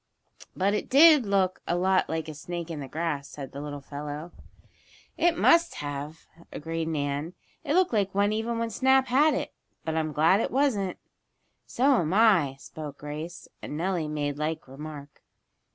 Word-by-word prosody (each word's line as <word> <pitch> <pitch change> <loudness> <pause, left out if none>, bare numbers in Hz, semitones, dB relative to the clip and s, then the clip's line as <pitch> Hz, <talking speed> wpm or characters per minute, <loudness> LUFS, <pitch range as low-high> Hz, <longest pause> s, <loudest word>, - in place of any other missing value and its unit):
"But 195 +2 +1
it 210 - -2
did 295 -3 +7
look 190 -2 +1
a 175 - +1
lot 185 +1 +2
like 160 -1 -2
a 155 - -6
snake 170 +3 -6
in 155 - -5
the 140 - -6
grass," 150 -2 -3
said 140 -3 -8
the 140 - -7
little 145 -1 -6
fellow. 150 +4 -7 0.8
"It 345 -1 +2
must 335 0 +4
have," 145 +2 -6 0.3
agreed 165 +1 -4
Nan. 145 +1 -2 0.3
"It 290 - 0
looked 370 -6 +3
like 200 -3 0
one 205 +1 +2
even 225 +2 -2
when 230 0 -2
Snap 265 +4 +3
had 295 +5 +4
it. - - -4 0.3
But 160 - -1
I'm 160 -1 -1
glad 160 +6 +4
it - - 0
wasn't." 235 -9 0 0.7
"So 265 +2 +3
am 170 0 0
I," 195 -11 +4
spoke 145 0 -9
Grace, 155 +4 -7
and 150 - -6
Nellie 175 -2 -1
made 145 -1 -3
like 155 0 -3
remark. 145 +1 -10
165 Hz, 170 wpm, -27 LUFS, 150-210 Hz, 0.8 s, did